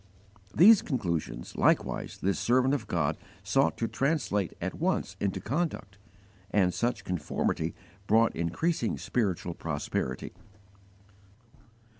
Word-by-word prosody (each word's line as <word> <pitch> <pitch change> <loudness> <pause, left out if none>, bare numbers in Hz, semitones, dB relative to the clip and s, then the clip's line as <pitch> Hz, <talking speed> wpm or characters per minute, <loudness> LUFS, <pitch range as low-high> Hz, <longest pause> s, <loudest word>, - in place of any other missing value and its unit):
These 210 +5 +8
conclusions 85 - -3
likewise - - +1
this 100 +1 +1
servant 130 +3 +3
of 145 - -2
God - - 0 0.3
sought 80 - +2
to 115 - -1
translate 135 - 0
at - - -3
once - - -1
into 100 -2 -1
conduct, 120 - -3 0.5
and 95 -3 +2
such 120 +1 -1
conformity 90 -5 -2 0.3
brought 115 +1 +4
increasing 115 - -1
spiritual 95 -7 -1
prosperity. 75 -3 -3
105 Hz, 105 wpm, -29 LUFS, 90-130 Hz, 0.5 s, These